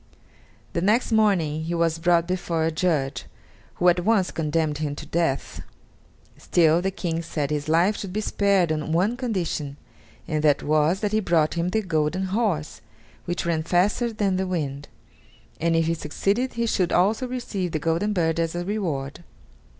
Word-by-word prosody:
The 170 - -1
next 215 +7 +2
morning 175 -8 +2
he 170 +1 -2
was 165 -1 +1
brought 170 0 +3
before 175 -3 -1
a 165 - +1
judge, 155 -5 -1 0.5
who 180 - +1
at 175 0 +5
once 205 -2 +2
condemned 155 -1 -1
him 145 -2 -2
to - - -8
death. 165 -5 -1 0.8
Still, 165 0 +3
the 190 - 0
King 175 -4 -3
said 150 -3 -3
his 150 0 -2
life 175 +6 +3
should 195 - -5
be 210 - -2
spared 200 -5 +2
on 155 0 -2
one 190 +8 +2
condition, 175 - -3 0.5
and 155 -2 -1
that 150 -2 +3
was, 155 +5 +2
that 210 -2 0
he 215 - +2
brought 165 -6 +2
him 170 +1 -1
the 220 +3 0
golden 160 +1 0
horse, 185 - -1 0.4
which 175 0 -3
ran 165 -2 0
faster 190 +8 +1
than 200 -4 0
the 190 0 -1
wind; 145 -6 -3 0.7
and 165 0 +1
if 165 0 +2
he 165 - +1
succeeded 200 +10 -1
he 235 0 -1
should 185 -6 0
also 215 +8 +2
receive 210 -8 -3
the 155 - -1
golden 165 +6 0
bird 170 -4 0
as 165 0 -1
a 175 0 -3
reward. 170 -8 -3
170 Hz, 175 wpm, -24 LUFS, 155-195 Hz, 0.8 s, at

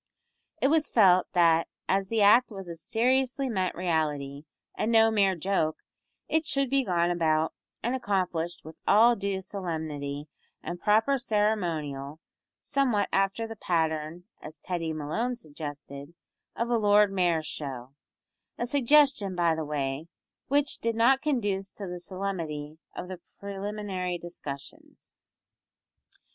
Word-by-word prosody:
It 270 - +3
was 310 -1 +3
felt 185 -5 +5
that 165 -2 +4 0.2
as 195 0 +1
the 220 0 +2
act 230 +5 +6
was 195 -3 -8
a 170 - -5
seriously 255 - 0
meant 190 -5 -1
reality, 150 -5 -1 0.3
and 225 - 0
no 225 -1 +6
mere 200 -3 +3
joke, 165 -3 0 0.5
it 320 -1 0
should 275 -2 0
be 275 -1 +3
gone 175 -4 +1
about 160 -2 +1 0.3
and 240 - 0
accomplished 180 -9 -1
with 160 0 -10
all 235 +3 +6
due 200 -2 -2
solemnity 155 -7 -4 0.4
and 175 - -5
proper 225 +6 +3
ceremonial, 165 - -1 0.4
somewhat 245 -8 +1
after 195 +3 +1
the 225 0 -7
pattern 160 -2 -1 0.2
as 155 0 -9
Teddy 165 +1 -3
Malone 160 +12 -2
suggested 145 - -8 0.4
of 235 +1 -2
a 235 - +4
Lord 205 -1 +5
Mayor's 175 -4 +1
Show; 135 -4 -6 0.6
a 240 - -1
suggestion, 270 -6 +3
by 170 -2 +3
the 160 0 -3
way, 145 +1 -3 0.4
which 285 +1 +1
did 230 0 -1
not 255 +4 +4
conduce 205 -9 -1
to 200 - -7
the 180 -1 -6
solemnity 170 -5 -5 0.2
of 180 - -5
the 185 -1 -7 0.2
preliminary 200 -2 -4
discussions. 160 -5 -9
185 Hz, 135 wpm, -28 LUFS, 160-225 Hz, 0.6 s, act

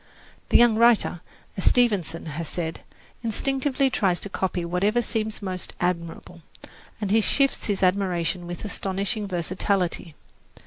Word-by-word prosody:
The - - +6
young 235 -2 +5
writer, 230 -7 +4 0.3
as 190 - -2
Stevenson 205 -9 +2
has 160 +1 -5
said, 165 -2 -3 0.4
instinctively 270 +4 0
tries 185 -7 +1
to 200 - -5
copy 185 -2 -2
whatever 200 +7 +1
seems 220 -2 -3
most 185 -2 -4
admirable, 170 -1 -3 0.6
and 205 -2 -2
he 220 +1 +5
shifts 275 +5 +2
his 200 -2 -1
admiration 180 -2 0
with 175 +4 -6
astonishing 200 +2 -2
versatility. 180 -2 -1
195 Hz, 130 wpm, -25 LUFS, 175-220 Hz, 0.6 s, The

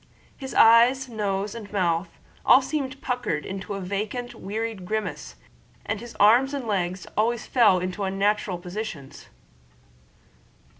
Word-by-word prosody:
His 265 -1 -8
eyes, 240 +4 +6
nose, 205 -3 -2
and 220 -4 -9
mouth 175 -3 0 0.3
all - - +6
seemed 275 -3 -3
puckered 245 - -2
into 195 +1 -5
a - - -4
vacant, 210 +6 -4
wearied 220 -1 -5
grimace, 215 +3 -4 0.5
and 215 - -2
his 235 +1 -10
arms 245 +7 +5
and 270 -3 -4
legs 185 -4 -2
always 230 +2 0
fell 220 -7 +4
into 185 +3 -3
unnatural 195 0 0
positions. 175 -6 -7
210 Hz, 130 wpm, -25 LUFS, 190-235 Hz, 0.5 s, eyes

